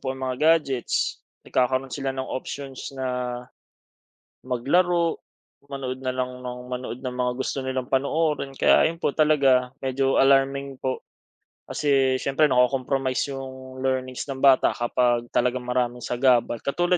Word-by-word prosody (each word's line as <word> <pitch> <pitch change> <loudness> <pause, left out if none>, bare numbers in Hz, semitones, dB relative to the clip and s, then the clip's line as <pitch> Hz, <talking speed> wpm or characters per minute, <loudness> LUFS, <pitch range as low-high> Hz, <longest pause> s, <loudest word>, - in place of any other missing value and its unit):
po - - -5
ang 130 - -5
mga 150 +6 +4
gadgets, 135 -6 -2 0.2
nagkakaroon 130 +1 0
sila 135 -1 -3
ng 130 - -2
options 135 0 -6
na 125 -1 -2 1.1
maglaro, 170 +7 +1 0.5
manood 130 -1 -5
na 130 - 0
lang 125 0 -4
nang 125 0 -7
manood 125 -1 -5
ng 125 -1 -5
mga 125 0 0
gusto 130 0 -2
nilang 130 -1 -3
panoorin. 140 +2 0
Kaya 135 - +4
ayun 165 +1 0
po 145 - -1
talaga. 135 -5 +3
Medyo 135 0 +1
alarming 135 0 +3
po 130 0 -4 0.6
kasi 135 -3 +2
siyempre 140 +3 +2
nako-compromise 130 +1 +1
'yong 130 -1 -8
learnings 130 -1 -2
ng 135 -2 -6
bata 135 -2 +5
kapag 120 0 0
talagang 125 0 +1
maraming 125 0 -1
sagabal. 125 -1 +2
Katulad 175 +5 +1
130 Hz, 140 wpm, -24 LUFS, 125-140 Hz, 1.1 s, bata